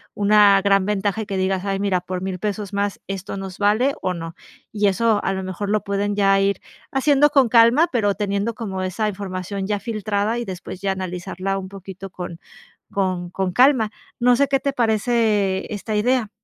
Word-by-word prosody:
una 205 -1 +5
gran 195 -1 +3
ventaja 205 +1 -1
que 200 -2 -3
digas, 190 0 0
ay, 195 -1 -1
mira, 195 -3 0
por 185 0 -5
$1000 190 -1 -3
pesos 205 0 -3
más 200 0 -1
esto 195 0 -5
nos 195 -1 -7
vale, 215 +7 +3
o 185 - 0
no. 165 0 -7 0.4
Y 210 -1 +1
eso 215 +2 +2
a 195 - 0
lo 190 0 -3
mejor 185 +2 -4
lo 215 0 +1
pueden 200 +1 -1
ya 195 -1 +4
ir 200 0 +1 0.3
haciendo 285 +2 +4
con 275 -5 +4
calma, 235 +8 +5
pero 205 -4 +1
teniendo 205 +2 -1
como 195 -4 -4
esa 200 +4 -1
información 190 0 -5
ya 205 -1 -1
filtrada, 215 0 -1
y 240 - -4
después 185 -1 -7
ya 195 -1 0
analizarla 185 +1 -4
un 190 - -7
poquito 195 0 -9
con 175 -2 -7 0.5
con 185 -3 -1
con 185 0 -2
calma, 250 -1 +4 0.3
¿no 245 +1 +5
sé 280 +2 +2
qué 270 0 +2
te 280 - -1
parece 220 -5 +1
esta 215 +1 -4
idea? 240 +1 +1
200 Hz, 190 wpm, -21 LUFS, 190-220 Hz, 0.5 s, una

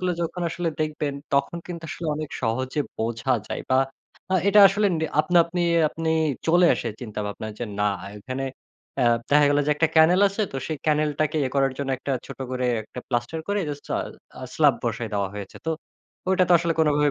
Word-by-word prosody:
গুলো 180 -1 0
যখন 170 +2 -3
আসলে 170 +1 -2
দেখবেন 150 -2 -1 0.2
তখন 140 +4 +1
কিন্তু 170 -2 -7
আসলে 160 +3 -5
অনেক 155 -1 -5
সহজে 130 +5 -1 0.2
বোঝা 115 +3 -1 0.2
যায়। - - -4
বা 130 - +5 0.5
আ - - +4
এটা 210 +1 +7
আসলে 205 +2 +1
নি 160 - 0 0.2
আপনা 175 +2 +3
আপনি 175 +1 -2 0.3
আপনি 160 +1 -3 0.4
চলে 175 +2 +5
আসে 120 - -3
চিন্তাভাবনা 105 -2 -5
যে, 120 - -2 0.2
না 105 0 +3 0.3
এখানে 130 +5 -4 0.6
এ - - +4 0.3
দেখা 145 0 +6
গেল 145 - +3
যে 150 - +2
একটা 165 +1 +2
ক্যানেল 170 +4 +6
আছে 200 +2 -2
তো 135 - -3
সেই 155 -3 -3
ক্যানেলটাকে 155 0 +1
ইয়ে 130 - -1
করার 135 -1 +2
জন্য 140 -1 -2
একটা 140 - -3
ছোট - - -9
করে 130 0 -1 0.2
একটা 110 +3 -9
প্লাস্টার 120 +6 -2
করে 205 0 +1
জাস্ট 145 -1 -6
স্লা - - 0 0.4
আ - - -8
স্লাব - - +5
বসায় 115 - -2
দেওয়া 100 -1 0
হয়েছে, 100 -1 -8
তো 160 - +1 0.6
ওইটা 185 -1 +4
তো - - +5
আসলে 170 0 0
কোনভাবে 150 -2 +3
150 Hz, 195 wpm, -24 LUFS, 130-170 Hz, 0.6 s, এটা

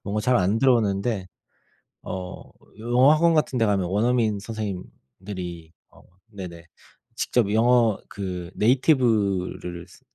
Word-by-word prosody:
뭔가 105 +1 -2
잘 125 +3 +2
안 100 +3 +1
들어오는데 110 -5 +1 0.8
어 90 -1 -6 0.4
영어 120 +5 +4
학원 165 +2 +3
같은 150 -4 +1
데 115 - +3
가면 100 -3 +1
원어민 110 +1 +1
선생님들이 95 -4 -7 0.2
어 - - -20 0.3
네네. 90 -6 -9 0.5
직접 115 -5 0
영어 115 -1 +3
그 90 -3 -6
네이티브를 105 - +1
쓰 - - -18
105 Hz, 245 characters per minute, -24 LUFS, 95-120 Hz, 0.8 s, 영어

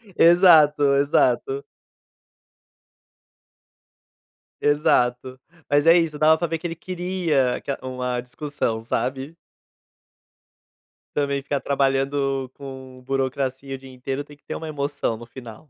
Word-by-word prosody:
Exato, 155 -5 +6
exato. 140 -1 +1 3.0
Exato. 130 -3 +1 0.3
Mas 145 +1 +3
é 165 +1 +7
isso, 160 -3 0
dava 155 +1 +5
pra 170 - -1
ver 165 0 -2
que 175 - -5
ele 165 - -6
queria 175 -7 -1
ca 140 - -2
uma 125 -1 -3
discussão, 125 -3 -3
sabe? 135 +6 -3 1.8
Também 140 -1 -1
ficar 140 0 -2
trabalhando 135 -1 0
com 130 -2 -10
burocracia 135 0 -2
o - - -7
dia 130 0 -13
inteiro 135 +3 -4
tem 145 - -15
que 145 - -34
ter - - -6
uma 160 - -6
emoção 145 -5 -2
no 115 +1 -11
final. 120 +3 -12
140 Hz, 120 wpm, -23 LUFS, 130-150 Hz, 3.0 s, é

